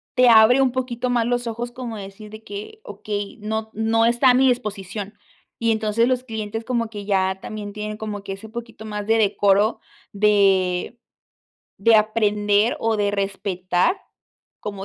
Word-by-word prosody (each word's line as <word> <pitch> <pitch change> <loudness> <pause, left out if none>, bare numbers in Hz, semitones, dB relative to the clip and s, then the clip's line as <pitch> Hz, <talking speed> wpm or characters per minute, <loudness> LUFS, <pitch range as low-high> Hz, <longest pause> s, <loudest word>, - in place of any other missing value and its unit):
te 250 -1 +6
abre 230 +4 +7
un 260 -2 +3
poquito 250 -1 -3
más 235 -2 +1
los 245 0 -1
ojos 235 +1 -4
como 240 -3 -6
decir 200 +2 -10
de 215 0 -11
que: 210 - -9
"Okey, 205 0 -5
no 220 +1 -3
no 225 +1 +2
está 240 +2 +4
a - - +4
mi 265 +1 +4
disposición". 205 -4 -3 0.5
Y 230 -1 +2
entonces 220 +2 +1
los 255 -1 0
clientes 225 -1 -5
como 235 -2 -1
que 205 -2 -8
ya 190 -1 +1
también, 210 -2 -6
tienen 210 0 -5
como 210 -2 -5
que 195 - -5
ese 210 +3 -10
poquito 230 -2 -8
más 210 -1 -5
de 225 0 +3
decoro 205 +1 +2 0.3
de 195 -1 +2 0.8
de 225 +3 +4
aprender, 210 0 +2
o 225 -1 +1
de 205 -1 +1
respetar 195 - 0 0.6
como 200 -2 -6
215 Hz, 165 wpm, -22 LUFS, 205-230 Hz, 0.8 s, abre